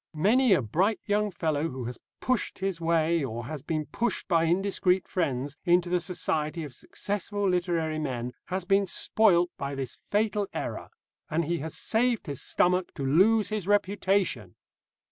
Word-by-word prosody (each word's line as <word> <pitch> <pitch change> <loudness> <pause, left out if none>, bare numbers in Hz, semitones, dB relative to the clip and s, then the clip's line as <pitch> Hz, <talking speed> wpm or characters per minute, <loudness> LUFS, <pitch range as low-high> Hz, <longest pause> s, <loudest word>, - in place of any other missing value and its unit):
Many 225 +7 +4
a 150 - +2
bright 185 - +1
young 210 0 +1
fellow, 160 -4 -1
who 130 -1 -6
has 120 0 -6 0.2
pushed 255 -3 0
his 190 -3 -3
way, 165 -1 +2
or 120 -2 -4
has 150 +1 -5
been 155 +1 -2
pushed 235 +11 -2
by 165 -3 +3
indiscreet 185 +1 +1
friends, 140 -5 -2
into 175 0 +3
the 180 - +3
society 160 -2 -1
of 145 -4 -8
successful 205 +6 -2
literary 170 -4 0
men, 125 -4 -3
has 185 0 -3
been 195 +1 +3
spoilt 180 -2 +3
by 140 0 -3
this 135 -2 -5
fatal 210 -1 +1
error, - - -4 0.4
and 165 +1 0
he 170 +2 -1
has 155 +2 -5
saved 235 -1 +1
his 145 -5 -4
stomach 180 0 +1
to 140 - -3
lose 200 +10 +4
his 210 -4 -3
reputation. 200 -1 +1
175 Hz, 165 wpm, -28 LUFS, 155-200 Hz, 0.4 s, Many